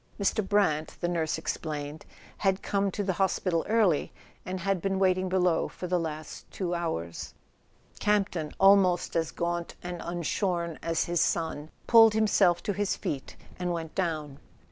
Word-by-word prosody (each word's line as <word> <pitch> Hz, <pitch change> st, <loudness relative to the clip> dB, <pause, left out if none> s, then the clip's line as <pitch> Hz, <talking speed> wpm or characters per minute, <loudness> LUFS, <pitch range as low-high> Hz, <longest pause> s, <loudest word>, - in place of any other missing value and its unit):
Mr. 200 Hz, +2 st, +1 dB
Brant, 190 Hz, -7 st, +1 dB
the 175 Hz, -, -1 dB
nurse 165 Hz, -3 st, -1 dB
ex¬ 160 Hz, -, -3 dB
plained, 150 Hz, -1 st, -5 dB, 0.3 s
had 195 Hz, -1 st, +1 dB
come 200 Hz, 0 st, +1 dB
to 205 Hz, -, -3 dB
the 190 Hz, -1 st, 0 dB
hospital 185 Hz, -3 st, +1 dB
early, 210 Hz, -9 st, +2 dB, 0.4 s
and 185 Hz, 0 st, -3 dB
had 195 Hz, -1 st, 0 dB
been 195 Hz, +1 st, 0 dB
waiting 185 Hz, -1 st, +2 dB
below 180 Hz, -2 st, +2 dB
for -, -, -8 dB
the 180 Hz, 0 st, +1 dB
last 155 Hz, -2 st, -6 dB
two 180 Hz, -2 st, -3 dB
hours. 125 Hz, -, -4 dB, 0.6 s
Camp 210 Hz, -1 st, +2 dB
ton, 155 Hz, -4 st, -4 dB
almost 195 Hz, -2 st, +4 dB
as 165 Hz, -1 st, +1 dB
gaunt 170 Hz, 0 st, -3 dB
and 175 Hz, -1 st, -5 dB
unshorn 170 Hz, 0 st, -2 dB
as 165 Hz, -1 st, 0 dB
his 175 Hz, -1 st, 0 dB
son, 160 Hz, -2 st, -1 dB, 0.2 s
pulled 225 Hz, -2 st, +7 dB
himself 200 Hz, -5 st, +3 dB
to 205 Hz, -, -1 dB
his 205 Hz, 0 st, 0 dB
feet 135 Hz, -2 st, -5 dB, 0.2 s
and 180 Hz, -1 st, -1 dB
went 165 Hz, -2 st, -4 dB
down. 155 Hz, -6 st, -2 dB
175 Hz, 165 wpm, -28 LUFS, 165-195 Hz, 0.6 s, pulled